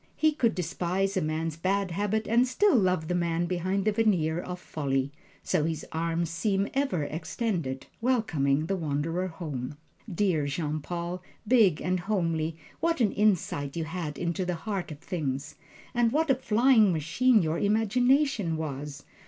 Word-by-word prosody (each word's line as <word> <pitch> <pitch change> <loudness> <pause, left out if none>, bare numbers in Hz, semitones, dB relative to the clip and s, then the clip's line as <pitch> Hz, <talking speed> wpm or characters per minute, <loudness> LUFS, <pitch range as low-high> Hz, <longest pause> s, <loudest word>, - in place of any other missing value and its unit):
He 310 0 +3
could 250 -7 +1
despise 185 +2 -1
a 190 - +1
man's 155 +1 -2
bad 190 +2 0
habits 205 +4 -1
and 235 +3 +4
still 355 +8 +3
love 185 -7 +2
the 180 - -1
man 170 -1 0
behind 185 +3 -1
the 215 - +4
veneer 180 -7 +2
of 180 0 -6
folly. 135 -5 -2 0.3
So 150 - +1
his 160 -1 -2
arms 165 0 -1
seem 195 +4 0
ever 270 - 0
extended, 160 - -3 0.2
welcoming 160 - +1
the 195 - -1
wanderer 165 +2 -1
home. 150 -6 -5 0.3
Dear 170 -5 +1
Jean 150 +1 -2
Paul, 175 +3 -4 0.3
big 210 -9 +4
and 185 0 0
homely, 165 -5 -1 0.2
what 335 -2 +1
an 225 -5 +3
insight 175 -9 +1
you 165 - -1
had 160 -2 -4
into 175 +1 -1
the 180 -1 -1
heart 190 +2 -4
of 150 - -7
things, 145 -4 -3 0.4
and 240 -1 +2
what 310 +1 +2
a - - +6
flying 235 -3 +4
machine 195 - +3
your 160 +1 -1
imagination 225 - +2
was! 145 -2 -5
175 Hz, 160 wpm, -28 LUFS, 160-210 Hz, 0.4 s, a